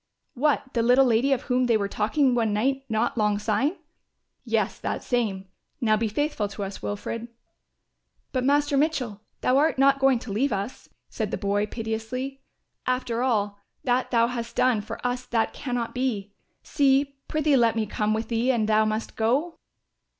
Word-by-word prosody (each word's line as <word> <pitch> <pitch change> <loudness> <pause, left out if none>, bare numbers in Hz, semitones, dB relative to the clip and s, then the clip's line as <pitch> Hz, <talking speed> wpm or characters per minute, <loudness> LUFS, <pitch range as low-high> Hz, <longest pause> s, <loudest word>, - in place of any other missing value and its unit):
"What, 275 0 0
the 235 - +1
little 250 +3 +5
lady 245 +3 +3
of 270 -1 +1
whom 250 -1 +1
they 230 -2 +4
were 200 -1 -1
talking 245 +7 +1
one 225 -3 +1
night 265 +6 0
not 220 +1 0
long 210 -1 +2
syne?" 220 - 0 0.7
"Yes, - - -1
that - - -3
same; 210 -6 -1 0.3
now 215 -3 +3
be 220 +1 0
faithful 225 -1 -1
to 200 0 -6
us, 195 0 -6
Wilfred." 225 +3 -4 1.0
"But, 255 -2 -1
Master 290 +1 +2
Mitchell, 270 -9 0 0.2
thou 255 - +3
art 305 -1 +2
not 275 +1 +4
going 270 -2 +4
to 230 -2 -8
leave 260 +8 +1
us," 200 +4 -4 0.2
said - - -2
the - - -2
boy 205 0 0
piteously. 235 +5 -4 0.5
"After 250 -2 0
all 205 -5 0 0.2
that 250 0 +1
thou 230 -2 +4
hast 235 -1 -4
done 245 -4 +3
for 220 +2 -7
us 245 0 -2
that 225 -2 0
cannot 245 -4 -3
be. 220 -6 -2 0.3
See, 275 -1 +2
prithee 305 -2 +2
let 235 -3 +3
me 220 -1 0
come 210 +1 0
with 220 +1 -3
thee 235 +2 +1
an 230 -4 +1
thou 215 0 +3
must 215 +1 -3
go." 270 +10 0
235 Hz, 175 wpm, -25 LUFS, 215-265 Hz, 1.0 s, little